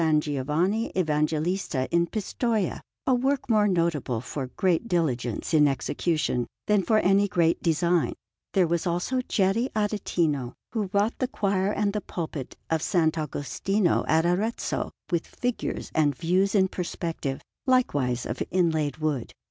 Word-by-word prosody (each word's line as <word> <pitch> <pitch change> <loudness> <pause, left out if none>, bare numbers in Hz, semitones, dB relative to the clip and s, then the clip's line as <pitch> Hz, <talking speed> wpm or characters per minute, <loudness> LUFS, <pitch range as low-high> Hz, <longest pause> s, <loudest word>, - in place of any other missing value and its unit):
Giovanni 150 - 0
Evangelista 155 -2 0
in 170 0 +3
Pistoia 215 0 -1 0.2
a 260 - +3
work 265 +2 +1
more 210 -1 +4
notable 165 - 0
for 130 +2 -5
great 185 +3 +1
diligence 135 - -1
in 150 -2 +6
execution 140 -1 0 0.2
than 210 -1 +3
for 220 +3 +2
any 200 0 +4
great 170 -3 +2
design. 170 +1 +2 0.4
There 190 -2 +4
was 170 +1 0
also 180 +10 0
Geri 225 +2 +1
Aretino, 170 - 0 0.2
who 210 -5 -2
wrought 205 +3 +1
the 255 - +1
choir 200 -5 0
and 205 -1 0
the 210 - -1
pulpit 160 -7 -5
of 160 - +3
S. 185 - -3
Agostino 160 +4 +1
at 160 +1 +3
Arezzo 200 +7 0 0.2
with 170 -2 0
figures 245 -1 -3
and 145 -3 +2
views 185 +7 +1
in 190 -2 +5
perspective, 165 -6 -3 0.3
likewise 145 - +2
of - - -4
inlaid 160 -5 +1
wood. 150 -6 -2
175 Hz, 140 wpm, -26 LUFS, 150-205 Hz, 0.4 s, in